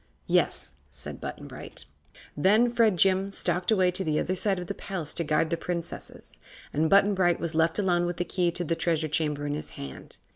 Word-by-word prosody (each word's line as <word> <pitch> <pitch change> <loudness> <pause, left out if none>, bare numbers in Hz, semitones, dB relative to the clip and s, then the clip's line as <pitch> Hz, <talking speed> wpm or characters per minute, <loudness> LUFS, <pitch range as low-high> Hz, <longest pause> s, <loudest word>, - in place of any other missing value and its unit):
"Yes," - - +1 0.2
said - - -9
Button - - -6
Bright. - - -8 0.5
Then 215 +10 +4
Fredjim 195 -4 +3
stalked 180 -2 -1
away 190 -5 +4
to 185 +2 0
the 155 -3 0
other 185 - -1
side 195 +1 +1
of 180 - -4
the 200 - -4
palace 185 -7 -4
to 170 - 0
guard 155 +1 +1
the 170 - +1
Princesses, 170 0 -6 0.4
and 155 +2 +2
Button 200 +1 +5
Bright 175 -3 +2
was 170 -1 -3
left 160 +1 +2
alone 175 -4 +2
with 175 -1 -3
the 175 - -1
key 175 0 +1
to 175 +1 -3
the 165 0 0
Treasure 165 -2 0
Chamber 150 -1 -1
in 145 - -1
his 150 - -5
hand. 70 -1 -7
175 Hz, 205 wpm, -27 LUFS, 160-190 Hz, 0.5 s, Button